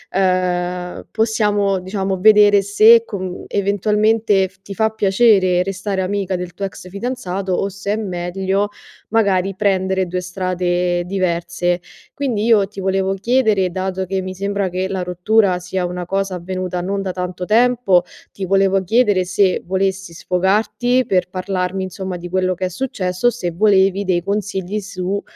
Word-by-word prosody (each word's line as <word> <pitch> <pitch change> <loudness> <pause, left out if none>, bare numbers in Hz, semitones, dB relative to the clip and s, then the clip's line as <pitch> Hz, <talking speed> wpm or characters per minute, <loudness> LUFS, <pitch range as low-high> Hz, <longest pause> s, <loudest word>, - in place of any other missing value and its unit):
uhm, 180 -1 -1
possiamo 210 -3 +1
diciamo 190 0 -2
vedere 205 -1 +6
se 220 +3 +6
con 185 -4 -5
eventualmente 210 0 +2
f 195 - -28
ti 200 - -7
fa 220 +2 +1
piacere 195 -3 +3
restare 195 +1 -2
amica 195 0 -2
del 180 -1 -6
tuo 195 - -3
ex 185 0 -9
fidanzato 195 -3 -3
o 195 +2 0
se 200 +1 -4
è - - -1
meglio 190 +1 -2 0.4
magari 195 -3 +1
prendere 190 -2 +1
2 180 +1 -3
strade 180 -1 -1
diverse. 175 -1 -1 0.3
Quindi 240 -7 -1
io 215 -4 +4
ti 195 - -10
volevo 190 0 0
chiedere 215 -3 +2
dato 190 0 -3
che 190 +1 -2
mi 185 0 -5
sembra 200 0 -2
che 185 +1 -2
la 190 -2 -3
rottura 180 +1 +2
sia 180 0 -3
una 180 0 -4
cosa 195 +1 -2
avvenuta 180 0 -4
non 195 +2 -2
da 190 - -3
tanto 180 0 -5
tempo, 225 -5 +3 0.3
ti 195 - -5
volevo 195 0 +2
chiedere 205 -4 +2
se 190 0 +1
volessi 190 -1 -1
sfogarti 215 +8 +1
per 180 -1 0
parlarmi 185 0 -2
insomma 185 0 -5
di 175 0 -8
quello 185 0 +1
che 185 +1 -3
è - - -2
successo, 185 -1 -1
se 185 -8 -4
volevi 195 +1 +3
dei 175 -2 0
consigli 200 0 -2
su, 195 0 -3
190 Hz, 155 wpm, -19 LUFS, 180-205 Hz, 0.4 s, vedere